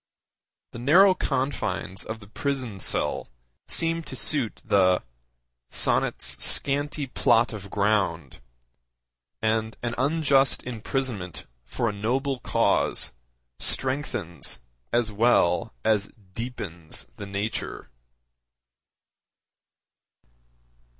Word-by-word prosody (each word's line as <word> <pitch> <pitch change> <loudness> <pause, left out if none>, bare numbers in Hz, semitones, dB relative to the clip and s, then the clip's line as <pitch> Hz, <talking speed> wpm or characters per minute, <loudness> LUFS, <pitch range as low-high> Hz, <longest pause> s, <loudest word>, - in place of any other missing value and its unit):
The - - -8
narrow 180 +10 +6
confines 130 - -2
of 110 0 -6
the 100 - -13
prison 125 -3 -3
cell - - +1 0.4
seem 165 0 +2
to - - -7
suit 135 -8 +1
the 95 -2 +3 0.7
'sonnet's - - +1
scanty 145 +1 +1
plot 120 -2 +2
of 100 -2 -7
ground,' 95 - 0 1.0
and 110 0 0
an 120 -1 -1
unjust 140 -1 +3
imprisonment 115 - -3 0.2
for 115 - -2
a 105 - -1
noble 130 +6 -1
cause - - +2 0.5
strengthens 130 - 0 0.3
as 120 -2 +1
well 105 -5 +3
as 105 -2 +2 0.2
deepens 95 -8 -5
the 100 - -7
nature. 100 - -4
115 Hz, 90 wpm, -26 LUFS, 100-135 Hz, 1.0 s, narrow